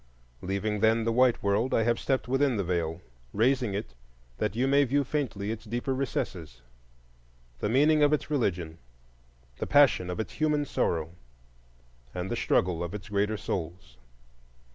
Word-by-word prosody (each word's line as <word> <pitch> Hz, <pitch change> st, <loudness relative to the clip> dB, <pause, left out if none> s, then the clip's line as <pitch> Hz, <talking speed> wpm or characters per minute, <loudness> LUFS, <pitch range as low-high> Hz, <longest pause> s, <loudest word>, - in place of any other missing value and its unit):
Leaving, 100 Hz, +3 st, -2 dB
then, 110 Hz, +2 st, +3 dB
the 115 Hz, -, 0 dB
white 125 Hz, +1 st, +3 dB
world, 100 Hz, +5 st, +1 dB
I 115 Hz, -, +3 dB
have 120 Hz, +1 st, +1 dB
stepped 130 Hz, -2 st, -1 dB
within 135 Hz, -1 st, +1 dB
the 100 Hz, -, 0 dB
Veil, 85 Hz, -1 st, -2 dB, 0.3 s
raising 120 Hz, -1 st, +1 dB
it 100 Hz, -10 st, -5 dB, 0.5 s
that 105 Hz, -1 st, -1 dB
you 125 Hz, +3 st, +1 dB
may 140 Hz, +1 st, +4 dB
view 140 Hz, +2 st, +1 dB
faintly 125 Hz, -8 st, -2 dB
its 115 Hz, -1 st, -6 dB
deeper 120 Hz, +4 st, -2 dB
recesses,—the -, -, -7 dB
meaning 150 Hz, +6 st, +4 dB
of 145 Hz, 0 st, +5 dB
its 150 Hz, 0 st, -1 dB
religion, 90 Hz, -, -1 dB, 0.8 s
the -, -, -3 dB
passion 140 Hz, -10 st, +4 dB
of 90 Hz, -, -4 dB
its 110 Hz, -, -4 dB
human 150 Hz, -2 st, +1 dB
sorrow, 80 Hz, -, -1 dB, 1.0 s
and 90 Hz, +1 st, -4 dB
the -, -, 0 dB
struggle 90 Hz, -6 st, +1 dB
of 85 Hz, +3 st, -5 dB
its 105 Hz, +1 st, -8 dB
greater 105 Hz, +1 st, 0 dB
souls. 85 Hz, -10 st, -5 dB
105 Hz, 155 wpm, -28 LUFS, 85-130 Hz, 1.0 s, of